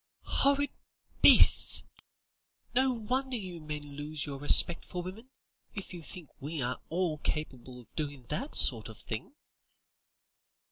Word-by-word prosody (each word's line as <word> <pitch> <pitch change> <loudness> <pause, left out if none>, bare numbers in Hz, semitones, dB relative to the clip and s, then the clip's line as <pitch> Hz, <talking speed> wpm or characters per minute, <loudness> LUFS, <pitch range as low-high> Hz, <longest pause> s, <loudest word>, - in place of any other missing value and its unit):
"Horrid 280 0 +3 0.5
beasts! - - +7 0.9
no 260 +2 +2
wonder 250 +3 -3
you 180 -5 -8
men 150 -1 -3
lose 145 +1 -5
your 140 -2 -7
respect 165 +3 +4
for 180 -1 -7
women, 210 +8 -10 0.5
if 195 -2 -8
you 175 - -8
think 165 -1 -5
we 150 +3 -6
are 125 -1 -3
all 165 -2 -2
capable 130 -5 -5
of 115 -3 -19
doing 145 -4 -5
that 265 - -3
sort - - +4
of - - -12
thing." 280 - -8
165 Hz, 135 wpm, -29 LUFS, 145-225 Hz, 0.9 s, beasts